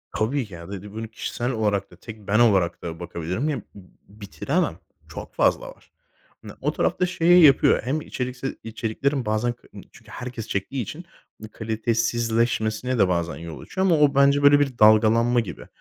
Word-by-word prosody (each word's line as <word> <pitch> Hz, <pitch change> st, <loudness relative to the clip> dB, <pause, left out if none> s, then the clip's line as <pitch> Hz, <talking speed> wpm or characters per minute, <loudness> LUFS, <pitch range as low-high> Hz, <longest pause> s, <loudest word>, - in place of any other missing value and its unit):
Tabii 125 Hz, +5 st, 0 dB
ki. 100 Hz, -, -15 dB
Ya 85 Hz, +1 st, -10 dB
bir 100 Hz, -2 st, -6 dB
de 105 Hz, +1 st, -11 dB
bunu 110 Hz, +2 st, -6 dB
kişisel 120 Hz, +3 st, -4 dB
olarak 105 Hz, -4 st, -1 dB
da -, -, -14 dB
tek 110 Hz, -3 st, -12 dB
ben 105 Hz, +2 st, +2 dB
olarak 95 Hz, -7 st, +3 dB
da 85 Hz, -1 st, -6 dB
bakabilirim. 90 Hz, -, -3 dB
Ya, 145 Hz, -, -1 dB
b -, -, -14 dB
b 95 Hz, -3 st, -14 dB, 0.3 s
bitiremem. 100 Hz, -, -2 dB, 0.3 s
Çok -, -, -9 dB
fazla -, -, +1 dB
var. -, -, -17 dB, 0.5 s
Hani, -, -, -10 dB
o -, -, 0 dB
tarafta 180 Hz, -, 0 dB
şeyi 175 Hz, -1 st, +4 dB
yapıyor 135 Hz, -3 st, +5 dB
hem 140 Hz, +6 st, -2 dB
içerikse 125 Hz, -1 st, -5 dB
içeriklerin 115 Hz, +5 st, -2 dB
bazen 110 Hz, +3 st, 0 dB
k 120 Hz, -, -24 dB
ııı, -, -, -10 dB
çünkü -, -, -17 dB
herkes 120 Hz, -3 st, -7 dB
çektiği 100 Hz, +7 st, -3 dB
için 155 Hz, -, -7 dB, 0.4 s
bir 110 Hz, -, -8 dB
kalitesizleşmesine 115 Hz, +1 st, -1 dB
de 100 Hz, -, +5 dB
bazen 85 Hz, -1 st, -1 dB
yol 80 Hz, 0 st, -8 dB
açıyor 190 Hz, +1 st, -2 dB
ama 170 Hz, -3 st, +4 dB
o 145 Hz, -2 st, +4 dB
bence, 140 Hz, +1 st, +4 dB
böyle, 145 Hz, 0 st, +7 dB
bir 135 Hz, -4 st, -1 dB
dalgalanma 110 Hz, +3 st, +5 dB
gibi. 100 Hz, -9 st, -6 dB
115 Hz, 185 wpm, -23 LUFS, 105-135 Hz, 0.5 s, böyle